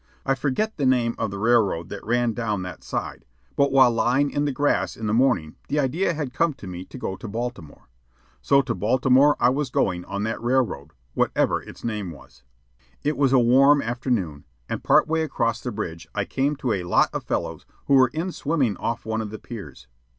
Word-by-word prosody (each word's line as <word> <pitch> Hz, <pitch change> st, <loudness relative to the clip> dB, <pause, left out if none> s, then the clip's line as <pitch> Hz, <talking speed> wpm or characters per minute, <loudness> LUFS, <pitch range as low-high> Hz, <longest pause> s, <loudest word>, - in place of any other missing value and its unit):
I 135 Hz, -, +2 dB
forget 145 Hz, -, -1 dB
the 140 Hz, -, 0 dB
name 120 Hz, -2 st, +2 dB
of 110 Hz, -, -1 dB
the 100 Hz, -, -6 dB
railroad 100 Hz, -6 st, +2 dB
that 100 Hz, -, -7 dB
ran 120 Hz, +1 st, +1 dB
down 105 Hz, -5 st, -2 dB
that 90 Hz, -, -8 dB
side, -, -, -4 dB, 0.3 s
but 140 Hz, 0 st, +2 dB
while 130 Hz, -2 st, +6 dB
lying 125 Hz, +5 st, +1 dB
in 145 Hz, -, 0 dB
the 145 Hz, -, 0 dB
grass 145 Hz, +2 st, 0 dB
in 110 Hz, -, -5 dB
the 105 Hz, -, 0 dB
morning 115 Hz, -11 st, +1 dB
the 145 Hz, -, -1 dB
idea 155 Hz, +6 st, 0 dB
had 145 Hz, -5 st, -4 dB
come 165 Hz, 0 st, +1 dB
to 120 Hz, -, -12 dB
me 90 Hz, 0 st, -7 dB
to -, -, -11 dB
go 95 Hz, -, -4 dB
to 115 Hz, -, -9 dB
Baltimore; 110 Hz, -8 st, -6 dB, 0.5 s
so 140 Hz, -, +4 dB
to -, -, -2 dB
Baltimore 130 Hz, +8 st, +3 dB
I 120 Hz, -, +4 dB
was 140 Hz, 0 st, -1 dB
going 90 Hz, -7 st, 0 dB
on 100 Hz, +1 st, -4 dB
that 110 Hz, +1 st, -3 dB
railroad, 120 Hz, -, 0 dB, 0.2 s
whatever -, -, +1 dB
its -, -, -13 dB
name 105 Hz, -5 st, -3 dB
was. 70 Hz, -5 st, -14 dB, 0.6 s
It 150 Hz, +1 st, 0 dB
was 135 Hz, -2 st, +2 dB
a 135 Hz, -, +5 dB
warm 135 Hz, +4 st, +5 dB
afternoon, 115 Hz, -, -2 dB, 0.2 s
and -, -, -4 dB
part -, -, +4 dB
way 160 Hz, 0 st, +1 dB
across 115 Hz, -7 st, -1 dB
the 125 Hz, -, -4 dB
bridge 85 Hz, -6 st, -5 dB
I -, -, 0 dB
came 140 Hz, +3 st, 0 dB
to 130 Hz, -4 st, -1 dB
a 95 Hz, -, -2 dB
lot 90 Hz, -, +3 dB
of -, -, -3 dB
fellows -, -, -3 dB, 0.2 s
who -, -, +1 dB
were 130 Hz, -1 st, +7 dB
in 160 Hz, +8 st, -3 dB
swimming 140 Hz, -, 0 dB
off 115 Hz, 0 st, -3 dB
one 110 Hz, 0 st, -1 dB
of 110 Hz, -, -5 dB
the 110 Hz, -, -7 dB
piers. 75 Hz, -, -10 dB
120 Hz, 210 wpm, -24 LUFS, 100-135 Hz, 0.6 s, were